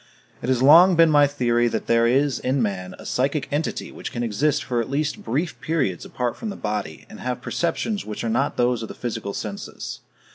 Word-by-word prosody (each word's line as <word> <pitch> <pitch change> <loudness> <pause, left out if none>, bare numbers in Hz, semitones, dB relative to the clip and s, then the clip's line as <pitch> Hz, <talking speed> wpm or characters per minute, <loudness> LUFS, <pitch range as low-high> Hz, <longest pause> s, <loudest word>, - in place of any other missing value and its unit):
It 125 - -3
has 130 -1 +2
long 170 +6 +8
been 165 -1 +6
my 145 -1 +6
theory 120 -4 +1
that - - -2
there 115 0 +3
is 135 +1 +2
in 130 +2 0
man 95 -5 -2
a - - -12
psychic 140 +2 0
entity 150 +3 -2
which - - -7
can 120 -2 -3
exist 130 +7 +1
for 120 -2 -1
at 115 - -5
least 145 +2 -1
brief 150 +9 -2
periods 150 - -1
apart 125 -1 -2
from 225 - -5
the 200 - -5
body, 105 -7 -4
and - - -12
have 125 -1 -3
perceptions 175 - -2
which 105 -1 -6
are - - -1
not 135 +6 0
those 120 -1 +2
of 110 - -5
the - - -9
physical 115 -4 -4
senses. 100 -2 -6
125 Hz, 215 wpm, -23 LUFS, 115-145 Hz, -, long